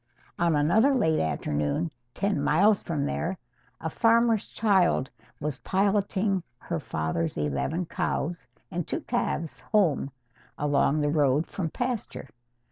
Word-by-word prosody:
On 170 -2 +3
another 215 - +4
late 160 -10 +2
afternoon, 80 - -1 0.2
ten 200 -7 0
miles 195 +8 +4
from 150 -4 -2
there, 180 +5 -2 0.4
a 160 - -3
farmer's 230 +4 +3
child 190 - +2 0.3
was 150 -3 -3
piloting 195 0 +1 0.2
her - - -4
father's 80 +1 -2
eleven 75 - -1
cows 170 0 -2 0.2
and 175 -2 -3
two - - -2
calves 150 -6 -2
home 150 +1 +1 0.5
along 145 +1 +2
the 145 0 +1
road 145 0 +3
from 170 -5 -3
pasture. 245 - -4
165 Hz, 125 wpm, -27 LUFS, 145-200 Hz, 0.5 s, another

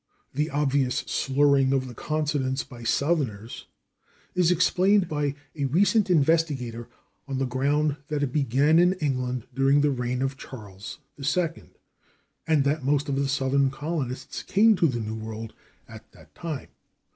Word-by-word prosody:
The 150 +4 -1
obvious 140 -3 0
slurring 135 -1 +2
of 135 -1 +1
the 125 - -8
consonants 145 -2 -1
by 125 -3 -12
Southerners 120 -3 -1 0.7
is 180 -2 +3
explained 185 +3 +3
by 145 -2 -1 0.2
a 140 -2 -1
recent 200 - +2
investigator 145 -8 +1 0.4
on 135 -1 -3
the 135 - 0
ground 140 +4 0
that 150 -1 -1
it 130 -3 -2
began 145 +3 +3
in 180 +1 +5
England 130 - -2
during 135 +2 +3
the 145 0 +3
reign 125 0 -2
of 135 0 -2
Charles 105 -7 -9 0.2
II, 165 +4 -1 0.8
and 155 -3 +3
that 145 +1 0
most 140 +1 +1
of 140 - 0
the 140 0 0
Southern 135 0 +2
colonists 140 -2 -4
came 220 +2 +4
to 170 - +4
the 125 -5 -2
New 110 0 -4
World 110 0 -7 0.3
at - - -13
that - - -19
time. 160 -5 -6
140 Hz, 150 wpm, -26 LUFS, 130-155 Hz, 0.8 s, in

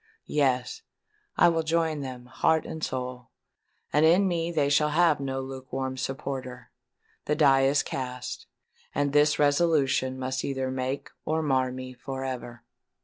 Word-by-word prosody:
Yes—I 175 - -1
will 165 -1 +1
join 160 -1 0
them, 130 -2 -7
heart 155 +5 +1
and 160 -1 -6
soul; 125 -2 -4 0.6
and 150 +2 +4
in 175 +5 +5
me 170 -1 -1
they 150 -4 +1
shall 150 +1 +3
have 160 0 +3
no 135 -1 -3
lukewarm 130 0 -5
supporter! 130 -2 -5 0.5
The 150 - +1
die 135 -3 +5
is 140 +2 +3
cast;—and 130 +2 -5
this 150 0 +4
resolution 145 -3 +2
must 130 0 -2
either 130 -1 -2
make 130 +2 -3
or 160 +1 0
mar 130 -3 +1
me 130 0 -7
for 135 +1 -6
ever!" 120 -2 -6
135 Hz, 140 wpm, -27 LUFS, 130-155 Hz, 0.6 s, in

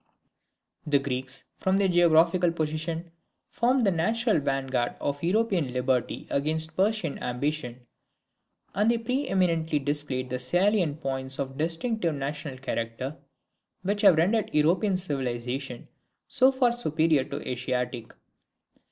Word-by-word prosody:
The 145 -1 +4
Greeks, 135 -1 -4 0.2
from 190 0 +2
their 200 -1 +3
geographical 175 0 +4
position, 160 +1 -3 0.4
formed 245 +1 +2
the 195 - +4
natural 220 +5 +1
vanguard 135 -3 -1
of 145 0 -2
European 180 - +1
liberty 125 -1 -1
against 160 +2 0
Persian 195 -5 0
ambition; 125 -1 -3 0.9
and 210 +4 +2
they 235 - +3
pre 255 +5 -2
eminently 165 - +1
displayed 140 -3 -2
the 125 - -2
salient 175 +2 +1
points 135 -1 -2
of 135 -1 -4
distinctive 170 - -1
national 140 0 -4
character, 130 +2 -4 0.7
which 205 +2 0
have 195 -5 +7
rendered 205 +6 +2
European 180 +6 +3
civilization 130 -5 -4 0.4
so 260 +2 +4
far 260 -2 +2
superior 160 - +2
to - - -6
Asiatic. 125 -2 -3
155 Hz, 120 wpm, -27 LUFS, 135-190 Hz, 0.9 s, have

